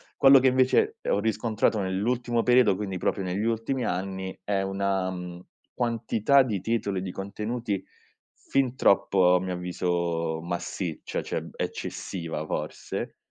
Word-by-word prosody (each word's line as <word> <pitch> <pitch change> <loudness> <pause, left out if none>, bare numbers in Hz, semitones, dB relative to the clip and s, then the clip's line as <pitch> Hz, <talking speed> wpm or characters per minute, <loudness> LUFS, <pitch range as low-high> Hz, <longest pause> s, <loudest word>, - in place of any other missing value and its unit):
Quello 135 0 +8
che 130 - +3
invece 130 0 +3
ho - - +2
riscontrato 110 0 +1
nell'ultimo 115 +5 0
periodo, 125 -5 +5
quindi 95 -1 -4
proprio 100 - 0
negli 95 +3 -2
ultimi 115 +3 -1
anni, 95 +1 -3
è 100 -1 0
una 95 -1 0
mhmm, 90 -1 -6 0.4
quantità 120 +2 +3
di 110 -7 -1
titoli 100 -3 -1
e - - -4
di 90 - -4
contenuti 105 +2 -3 0.7
fin 130 -2 +2
troppo 95 -5 +4
a 90 - +3
mio 95 -1 -3
avviso 85 -2 -1
massiccia, 85 0 -4
cioè - - -3
eccessiva 85 -4 -4
forse, 75 0 -4
100 Hz, 135 wpm, -27 LUFS, 90-115 Hz, 0.7 s, Quello